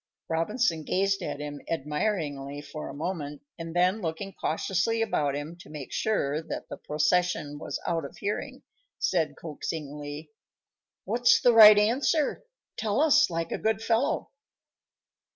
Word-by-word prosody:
Robinson 165 +1 0
gazed 195 +4 +1
at - - -4
him 145 -1 -6
admiringly 150 -3 -2
for 145 +1 -7
a - - -6
moment, 150 -3 -4 0.2
and 165 0 -6
then, 185 +4 +3
looking 180 +3 -4
cautiously 190 +7 0
about 145 -10 0
him, 145 +4 -5
to 175 - -14
make 150 -3 -8
sure 155 -9 0
that 160 - -6
the - - -6
procession 150 -1 0
was - - -4
out 165 -2 0
of 140 - -9
hearing, 205 +1 -4 0.3
said 160 -5 0
coaxingly: 150 -1 -6 0.7
"What's 240 +5 +4
the 245 - +5
right 215 -2 +10
answer? 265 +8 +2 0.4
Tell 215 +1 0
us, 310 0 +5
like 165 -1 -3
a - - -2
good 220 0 +1
fellow." 225 +4 0
165 Hz, 140 wpm, -28 LUFS, 150-210 Hz, 0.7 s, right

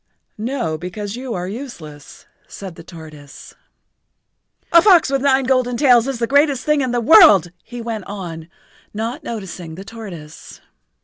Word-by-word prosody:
"No, 220 - -3
because 200 +4 -6
you 250 -1 -5
are 180 0 -4
useless," 180 - -10 0.2
said 190 -3 -9
the - - -13
tortoise. 155 -4 -13 1.2
"A 335 - +7
fox 350 -8 +5
with 275 -1 0
nine 270 -1 +2
golden 255 -2 0
tails 245 -3 +4
is 270 -2 -3
the 235 - -1
greatest 285 +1 +2
thing 300 -1 +2
in 260 - -1
the 240 0 0
world," 225 - +6
he 240 +1 -9
went 225 -4 -5
on, 170 -5 -8 0.5
not 235 +8 -4
noticing 185 -8 -7
the 190 +3 -10
tortoise. 195 -9 -11
225 Hz, 150 wpm, -19 LUFS, 175-265 Hz, 1.2 s, A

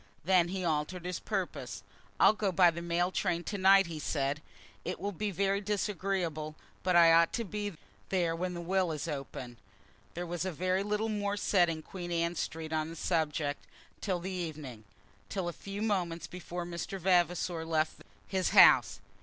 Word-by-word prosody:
Then 180 -1 +4
he 185 0 -3
altered 165 +3 -1
his 180 -1 -3
purpose. - - -4 0.4
"I'll - - +7
go 210 -2 0
by 175 -1 +6
the 170 +1 -6
mail 175 +1 0
train 175 -3 0
to 205 - -4
night," 195 +1 +7
he 165 -2 -6
said. 145 -1 -1 0.4
"It 180 - -4
will 200 +2 -2
be 210 +3 -2
very 200 +1 0
disagreeable, 190 -6 -2 0.3
but 180 -1 +1
I 165 -1 +8
ought 165 0 +5
to 235 - -1
be 205 -3 -4 0.3
there 175 -3 +1
when 180 +1 -3
the 175 - -4
will 185 0 +1
is 150 +1 -4
opened." 135 -5 -6 0.6
There 175 +1 -3
was 175 -1 -4
very 185 +1 0
little 210 +2 -1
more 205 -1 -1
said 180 -4 +3
in 160 -1 -4
Queen 175 0 -7
Anne 170 0 +1
Street 160 -1 -4
on 155 0 0
the 165 - -8
subject 155 -3 -1 0.4
till 185 -4 -1
the 185 +2 -5
evening, 155 - -6 0.4
till 190 -3 -2
a 175 - -3
few 200 +4 -6
moments 180 -6 -1
before 175 -1 -6
Mr. 175 +3 -5
Vavasor 175 -2 +2
left 160 -1 -1 0.3
his 190 -2 0
house. - - +7
175 Hz, 180 wpm, -31 LUFS, 165-190 Hz, 0.6 s, I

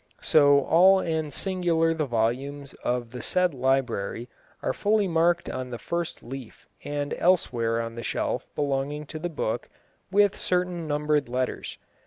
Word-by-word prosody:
So 145 -2 +5
all 185 +7 +6
and 160 -4 -2
singular 170 -1 +1
the 155 -3 -2
volumes 130 +4 -1
of 120 -1 -1
the 125 - -6
said 180 -2 +1
library 125 -3 -1 0.3
are - - 0
fully 210 -1 +2
marked 170 0 +2
on 130 0 -4
the 120 - -5
first 170 +8 -4
leaf 130 -1 -9 0.2
and 145 0 -3
elsewhere 120 -10 +2
on 115 0 -4
the 115 - -6
shelf - - -2
belonging 145 +1 -1
to 155 - -7
the 175 +2 -3
book, 145 -8 -3 0.4
with 205 +1 +4
certain 180 -2 -1
numbered 150 -2 0
letters. 125 +1 -3
145 Hz, 150 wpm, -26 LUFS, 125-170 Hz, 0.4 s, all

